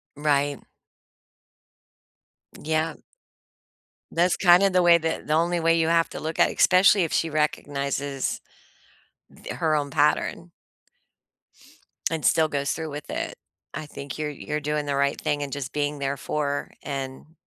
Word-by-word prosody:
Right. 145 -1 +1 2.0
Yeah. 160 +1 -1 1.2
That's 175 +2 +2
kinda 180 +2 +6
the 180 0 +3
way 175 -1 +6
that 160 -2 -3
the 150 - +1
only 170 +2 +2
way 165 0 +3
you 160 -1 +2
have 165 0 +3
to - - -7
look 160 +1 -5
at - - +5
especially 190 +1 +5
if 165 - -3
she 165 - +1
recognizes 140 -2 -2 0.9
the - - -9
her 160 -3 +1
own 145 -1 -1
pattern 150 +4 0 1.6
and 160 -2 -2
still 160 -1 +4
goes 140 -2 -1
through 160 0 -4
with 145 0 -8
it. - - -4 0.4
I 155 +1 -5
think 140 0 -8
you're 150 -1 -3
you're 150 +2 -4
doing 150 0 -2
the 140 - 0
right 140 0 +1
thing 145 0 -1
and 140 - -6
just 140 -2 -5
being 145 0 -1
there 140 0 -2
for 145 0 -2
and 135 +3 -6
150 Hz, 150 wpm, -25 LUFS, 145-165 Hz, 2.0 s, kinda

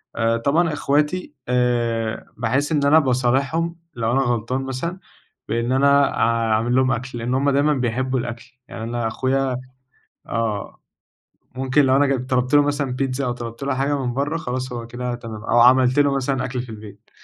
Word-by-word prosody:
آآ 115 0 +1
طبعًا 155 +7 +1
إخواتي 150 +4 0
آآ 120 -3 0
باحس 130 +7 0
إن 145 -3 +2
أنا 150 +3 +6
باصالحهم، 135 +5 0 0.2
لو 115 -1 -1
أنا 135 +2 +2
غلطان 120 +1 -1
مثلًا، 135 +8 -4 0.5
بإن 115 +2 -1
أنا 140 +1 +3
أع 115 -1 +2
أعمل 115 +3 +1
لهم 130 0 +3
أكل، 125 +1 -3
لإن 120 +2 -2
هُم 135 +2 +2
دايمًا 140 +2 +3
بيحبوا 130 0 -1
الأكل، 120 0 -5 0.2
يعني 110 - -7
أنا 120 0 -2
أخويا 130 +2 0 0.7
آه، 110 -3 -3 0.8
ممكن 135 +3 +2
لو 130 0 +4
أنا 145 +1 +4
جب 130 -2 -1
طلبت 130 +1 0
له 145 - +7
مثلًا 145 -1 -1
بيتزا 135 +1 -2
أو 125 - 0
طلبت 120 0 -8
له 140 -1 0
حاجة 140 +2 0
من 120 - -2
برّه، 145 +4 -1
خلاص 130 -4 -4
هو 120 -1 -5
كده 125 +1 -4
تمام، 115 -3 -8
أو 120 +1 +3
عملت 130 +2 +5
له 140 -1 +3
مثلًا 135 -1 -1
أكل 125 -1 -3
في 125 - -10
البيت. 105 -1 -12
130 Hz, 180 wpm, -21 LUFS, 120-140 Hz, 0.8 s, له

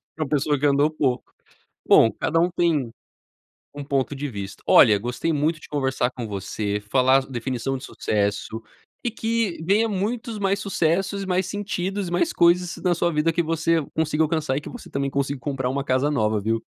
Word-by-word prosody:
Para 155 - -2
uma 135 - -7
pessoa 145 0 +1
que 145 - -4
andou 145 +1 +3
pouco, 135 -5 -1 0.6
bom, 115 - +7
cada 165 - -1
um 175 +2 +2
tem 165 -8 +1 0.8
um 145 0 -6
ponto 140 0 -1
de 145 +2 -3
vista. 100 -3 -7
Olha, 105 -3 +7
gostei 120 +9 -2
muito 155 +2 0
de - - -13
conversar 135 -3 0
com 125 -2 -6
você, 100 0 -3
falar 130 +1 +4
definição 130 +1 -3
de 130 - -11
sucesso, 105 +2 -2 0.4
e 240 - 0
que 225 -4 -1
venha 205 +7 +2
muitos 220 +3 -3
mais 195 0 +1
sucessos, 195 +1 0
e - - -5
mais 185 0 0
sentidos 200 -1 -3
e - - -6
mais 325 - +1
coisas 175 +1 +3
na 180 -2 +2
sua 170 0 0
vida, 150 +2 +2
que 170 +1 +1
você 165 0 +1
consiga 160 -1 +1
alcançar 155 -4 0
e - - -1
que - - -8
você 245 - -10
também 140 0 -2
consiga 140 0 -1
comprar 130 0 -2
uma 135 +1 -2
casa 130 +2 +1
nova, 110 -6 +1
viu. 115 +2 -1
150 Hz, 195 wpm, -23 LUFS, 130-175 Hz, 0.8 s, bom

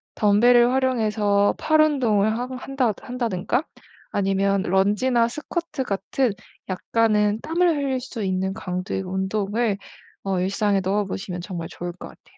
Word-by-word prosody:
덤벨을 240 +4 +5
활용해서 215 -6 +2
팔 310 0 +2
운동을 225 -8 +2
하거 255 +1 -4
한다 255 -2 -1
한다든가 245 - -1 0.5
아니면 195 0 +1
런지나 210 +6 +2
스쿼트 305 +1 -4
같은 210 +3 -1 0.4
약간은 210 +2 +1
땀을 345 +2 +2
흘릴 270 -2 -1
수 245 -3 -6
있는 190 0 -1
강도의 185 +1 -4
운동을 195 +3 -1 0.5
어 195 -2 -1
일상에 195 +1 +1
넣어보시면 190 -1 -2
정말 175 -3 -5
좋을 175 0 -6
것 180 - -10
같아요. - - -21
210 Hz, 305 characters per minute, -23 LUFS, 195-250 Hz, 0.5 s, 덤벨을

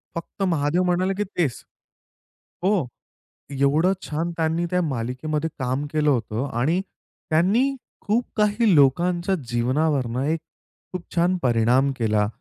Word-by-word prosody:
फक्त 170 +4 -7
महादेव 155 +4 +1
म्हणाले 180 +2 +1
की 210 - +1
तेच. 175 - -2 1.0
हो, 190 -9 +2 0.7
एवढं 145 +7 +2
छान 165 +3 -3
त्यांनी 165 +1 0
त्या 180 0 +1
मालिकेमध्ये 150 +4 -2
काम 130 +2 -1
केलं 150 -1 +2
होतं 120 +1 -1
आणि 165 +8 +2 0.5
त्यांनी 210 +13 +3 0.3
खूप 230 +4 +2
काही 210 -1 +3
लोकांच्या 170 +6 +3
जीवनावरन 125 +1 0
एक 160 +2 0 0.5
खूप 180 -2 -5
छान 180 +2 +2
परिणाम 125 +3 +3
केला. 105 -2 +2
155 Hz, 120 wpm, -23 LUFS, 130-180 Hz, 1.0 s, त्यांनी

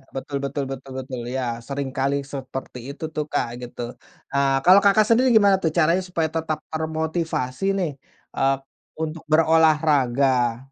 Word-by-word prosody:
betul 140 +1 -4
betul 140 +1 -2
betul 135 0 -8
betul, 130 -1 -6
iya. 130 +1 -2 0.2
Seringkali 140 0 -1 0.2
seperti 130 -1 -6
itu 145 +3 -9
tuh, 150 - -1
Kak, 145 - 0
gitu. 120 0 -8 0.5
Eee, 140 -1 +2
kalau 185 +2 +8
Kakak 205 +1 +5
sendiri 245 +3 +4
gimana 200 -2 +5
tuh 160 - +3
caranya 170 +3 +3
supaya 165 -3 0
tetap 160 -1 -1
termotivasi 160 -2 -2
nih, 175 -5 -1 0.4
eee, 135 0 +2 0.5
untuk 160 +1 -5
berolahraga? 145 -6 +3
150 Hz, 140 wpm, -23 LUFS, 135-160 Hz, 0.5 s, kalau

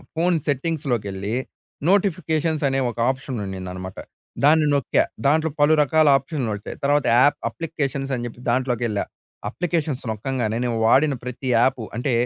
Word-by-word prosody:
Phone 175 +2 +2
సెట్టింగ్స్‌లోకెళ్ళి 120 - -2 0.5
notifications 165 -5 +1
అనే 135 0 0
ఒక 120 - -8
option 130 -1 -6
ఉండిదనమాట. 95 -1 -6 0.5
దాన్ని 155 +2 +5
నొక్కా, 140 -3 +2 0.2
దాంట్లో 160 +3 +3
పలు 145 +2 +5
రకాల 155 +2 +3
ఆప్షన్‌లోచ్చాయి. 120 -8 -4
తర్వాత 145 0 +2
యాప్ 145 +3 +4
అప్లికేషన్స్ 140 -4 -3
అని 120 -1 -4
చెప్పి 120 0 -8
దాంట్లోకేళ్ళా, 120 -4 0 0.5
అప్లికేషన్స్ 160 -1 -2
నొక్కంగానే 110 0 -2
నేను 120 -1 -1
వాడిన 145 +4 +4
ప్రతి 125 +1 -6
యాపు 125 +1 +2
అంటే 125 +3 -1
135 Hz, 125 wpm, -22 LUFS, 120-155 Hz, 0.5 s, దాన్ని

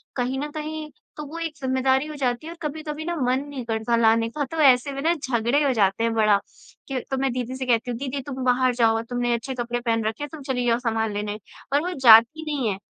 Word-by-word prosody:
कहीं 255 +1 -1
न 295 +1 -3
कहीं 310 0 -5 0.3
तो 300 - -5
वो 330 +3 -7
एक 325 -2 -3
ज़िम्मेदारी 260 +1 +1
हो 305 - -7
जाती 255 0 -1
है - - -6
और 340 - -11
कभी-कभी 310 0 -5
ना 345 0 -2
मन 255 +1 +2
नहीं 275 -4 -6
करता 225 +1 0
लाने 225 0 +3
का 290 +5 -3
तो 325 - -5
ऐसे 265 -1 +5
में 275 - -4
ना 330 +4 +3
झगड़े 260 -2 0
हो 275 - +2
जाते 200 -1 +2
हैं 230 0 +1
बड़ा, 215 -2 +4 0.5
के 265 -2 -2
तो 270 - 0
मैं 270 -1 0
दीदी 250 0 -3
से 260 0 -4
कहती 245 0 +1
हूँ, 235 - -4
"दीदी 275 0 -3
तुम 265 -2 -4
बाहर 255 0 +3
जाओ 225 -2 +3
तुमने 245 -1 0
अच्छे 235 +3 -3
कपड़े 240 0 -2
पहन 230 -2 0
रखे, 225 +7 -3
तुम 310 0 -10
चली 255 -2 -2
जाओ 235 0 +2
सामान 225 -2 -1
लेने" 210 +1 -4 0.3
और 285 - +4
वो 365 - -2
जाती 240 +6 +7
नहीं 265 -6 0
है। 195 -1 -3
255 Hz, 245 wpm, -24 LUFS, 230-285 Hz, 0.5 s, जाती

